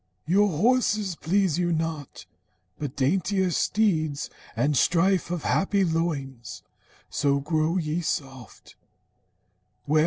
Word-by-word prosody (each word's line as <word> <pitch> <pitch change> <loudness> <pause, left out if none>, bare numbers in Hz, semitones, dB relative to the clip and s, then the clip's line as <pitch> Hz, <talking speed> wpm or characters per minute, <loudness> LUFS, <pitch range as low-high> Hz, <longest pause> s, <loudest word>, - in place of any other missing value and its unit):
Your 200 +6 +3
horses 210 +1 +1
please 180 0 +1
you 175 -1 +1
not, 160 -3 -3 0.5
but 145 -3 -5
daintier 185 +6 +1
steeds, 155 -8 0 0.2
And 145 +1 +1
strife 175 +6 +2
of 175 -3 -3
happy 195 0 +1
loins. 145 -7 -3 0.5
So 140 -1 +1
grow 155 +4 0
ye 160 0 -1
soft. 135 -6 -6
165 Hz, 100 wpm, -26 LUFS, 150-190 Hz, 0.5 s, Your